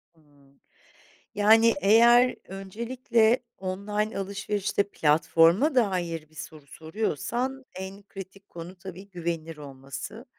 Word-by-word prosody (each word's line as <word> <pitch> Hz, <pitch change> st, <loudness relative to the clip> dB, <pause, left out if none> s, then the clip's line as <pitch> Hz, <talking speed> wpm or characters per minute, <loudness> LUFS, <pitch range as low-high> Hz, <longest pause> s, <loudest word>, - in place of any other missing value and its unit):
Hımm, 145 Hz, -3 st, -26 dB, 0.8 s
yani, 225 Hz, +3 st, +5 dB
eğer 235 Hz, +4 st, +6 dB
öncelikle 225 Hz, +4 st, 0 dB, 0.2 s
online 205 Hz, +3 st, -3 dB
alışverişte 200 Hz, +1 st, -1 dB
platforma 165 Hz, -, +3 dB
dair 175 Hz, -9 st, 0 dB
bir 155 Hz, -, -24 dB
soru 155 Hz, -3 st, -10 dB
soruyorsan 230 Hz, -, -3 dB
en 190 Hz, +2 st, -8 dB
kritik 195 Hz, 0 st, -11 dB
konu 170 Hz, +2 st, -9 dB
tabii 190 Hz, +2 st, -10 dB
güvenilir 165 Hz, -3 st, -4 dB
olması. 140 Hz, -, -9 dB
195 Hz, 100 wpm, -26 LUFS, 165-220 Hz, 0.8 s, eğer